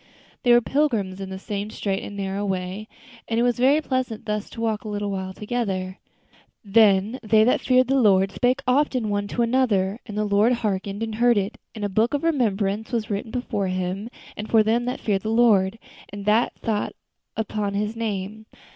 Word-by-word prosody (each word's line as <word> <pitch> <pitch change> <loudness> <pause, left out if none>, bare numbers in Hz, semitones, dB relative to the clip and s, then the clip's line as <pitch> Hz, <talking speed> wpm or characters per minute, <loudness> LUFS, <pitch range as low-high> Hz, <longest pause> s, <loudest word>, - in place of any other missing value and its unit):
They 245 - +3
were 240 0 +7
pilgrims 225 -9 0
in 190 - -5
the 190 - -5
same 205 +1 -4
straight 195 -2 -2
and 205 - -8
narrow 195 +1 -2
way, 190 +1 -3 0.4
and 225 0 0
it - - +3
was 245 -1 +1
very 275 +5 +4
pleasant 255 -6 -2
thus 210 -1 -3
to - - -10
walk 220 -2 -1
a - - -8
little 205 -1 -3
while 190 -1 -4
together. 195 -3 -3 0.7
"Then 205 +2 +4
they 215 -1 +4
that 245 - +2
feared 255 -1 +4
the 270 +1 +2
Lord 195 -3 +4
spake 255 +5 0
often 255 -4 +1
one 205 0 -1
to 235 +3 0
another; 230 -5 +1
and 210 -2 -6
the 210 - +1
Lord 205 +4 +3
hearkened 205 -2 -2
and 225 -1 -3
heard 240 +1 +3
it; 200 +2 -2 0.2
and 210 -2 -3
a - - +1
book 220 +7 +1
of 285 - -2
remembrance 220 -8 0
was 225 -3 -2
written 205 +2 -3
before 220 -5 -2
Him 185 +4 -3 0.4
for 220 -1 +5
them 230 +3 +1
that 250 - -3
feared 200 -3 0
the 215 - -3
Lord, 220 -3 +3 0.3
and 200 0 -8
that 215 +3 +3
thought 215 -3 -1 0.4
upon 210 -2 -2
His 210 +2 -1
name. 215 -1 -4
215 Hz, 195 wpm, -24 LUFS, 200-235 Hz, 0.7 s, were